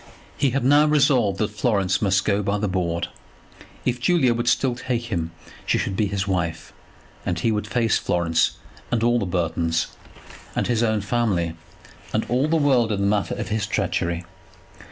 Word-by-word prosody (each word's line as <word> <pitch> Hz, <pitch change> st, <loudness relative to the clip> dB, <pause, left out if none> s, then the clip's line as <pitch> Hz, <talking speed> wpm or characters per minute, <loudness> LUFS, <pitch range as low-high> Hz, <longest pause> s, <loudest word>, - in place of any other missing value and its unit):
He 140 Hz, -, +2 dB
had 135 Hz, +1 st, -1 dB
now 145 Hz, +3 st, +5 dB
resolved 135 Hz, -9 st, +3 dB
that 105 Hz, +1 st, -1 dB
Florence 100 Hz, -3 st, +1 dB
must 100 Hz, -1 st, +2 dB
go 100 Hz, 0 st, +2 dB
by 100 Hz, +1 st, 0 dB
the 105 Hz, +1 st, -1 dB
board. 85 Hz, -3 st, -1 dB, 0.8 s
If 125 Hz, 0 st, 0 dB
Julia 130 Hz, -2 st, +3 dB
would 120 Hz, +1 st, -2 dB
still 130 Hz, +1 st, +2 dB
take 120 Hz, -1 st, -3 dB
him 85 Hz, -4 st, -1 dB, 0.3 s
she -, -, +1 dB
should 95 Hz, -, -2 dB
be 105 Hz, +1 st, +1 dB
his 100 Hz, 0 st, -2 dB
wife, 85 Hz, -4 st, -2 dB, 0.5 s
and 90 Hz, -, -1 dB
he 110 Hz, +6 st, +1 dB
would 105 Hz, -1 st, -2 dB
face 115 Hz, -3 st, +1 dB
Florence 80 Hz, -2 st, +1 dB, 0.3 s
and 115 Hz, -2 st, 0 dB
all 120 Hz, +1 st, +3 dB
the 100 Hz, -, -2 dB
Burtons, 85 Hz, -2 st, 0 dB, 0.7 s
and -, -, 0 dB
his 120 Hz, -2 st, +1 dB
own 110 Hz, -2 st, +1 dB
family, 100 Hz, -7 st, 0 dB, 0.6 s
and 110 Hz, -, 0 dB
all 130 Hz, +5 st, +2 dB
the 165 Hz, -, +1 dB
world 130 Hz, -7 st, +3 dB
in 100 Hz, -, -1 dB
the -, -, +1 dB
matter 100 Hz, 0 st, +1 dB
of -, -, -5 dB
his 110 Hz, 0 st, -1 dB
treachery. 85 Hz, 0 st, -1 dB
105 Hz, 180 wpm, -23 LUFS, 95-120 Hz, 0.8 s, now